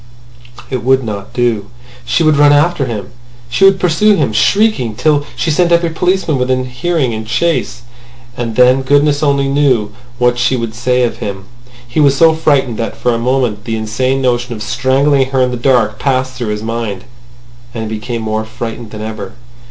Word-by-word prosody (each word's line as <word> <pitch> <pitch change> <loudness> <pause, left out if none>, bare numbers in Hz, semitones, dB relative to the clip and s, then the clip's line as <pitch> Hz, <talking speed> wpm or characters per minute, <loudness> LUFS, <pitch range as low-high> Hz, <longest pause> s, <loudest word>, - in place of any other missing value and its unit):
It 130 -3 -3
would 130 +1 +3
not 100 -3 -6
do. 115 -4 -1 0.4
She 145 +7 +1
would 155 -1 +4
run 145 0 +6
after 145 0 +2
him. 105 -5 -5 0.4
She 195 +11 +3
would 195 -1 +5
pursue 190 +5 +3
him 145 - 0
shrieking 130 - +2
till 145 +2 +1
she 165 - -1
sent 170 +3 +2
every 170 -1 +2
policeman 180 -4 0
within 130 0 0
hearing 130 +1 -1
in 110 0 -4
chase. 125 +1 -1 0.5
And 115 -2 -4
then 125 +2 +4
goodness 145 +2 +2
only 140 -2 +1
knew 135 -7 +1 0.3
what 125 0 +1
she 125 +2 +2
would 115 -2 -3
say 125 +1 0
of 120 - -1
him. 95 -2 -6 0.4
He 120 - -2
was 140 -2 +4
so 165 +1 +5
frightened 140 -7 +1
that 115 - -4
for 125 - 0
a 115 - -1
moment 120 -3 -1
the 115 - -2
insane 130 +5 -1
notion 120 -1 0
of 105 - -7
strangling 130 +4 +1
her 135 -1 0
in 125 - 0
the - - -2
dark 120 -3 +1
passed 130 -1 0
through 125 -3 -5
his 105 0 -3
mind. 115 -4 -4 0.7
And 115 - -3
he 110 - -3
became 115 +1 -5
more 110 0 -2
frightened 115 0 -7
than 105 0 -8
ever! 110 -3 -6
125 Hz, 190 wpm, -14 LUFS, 115-145 Hz, 0.7 s, run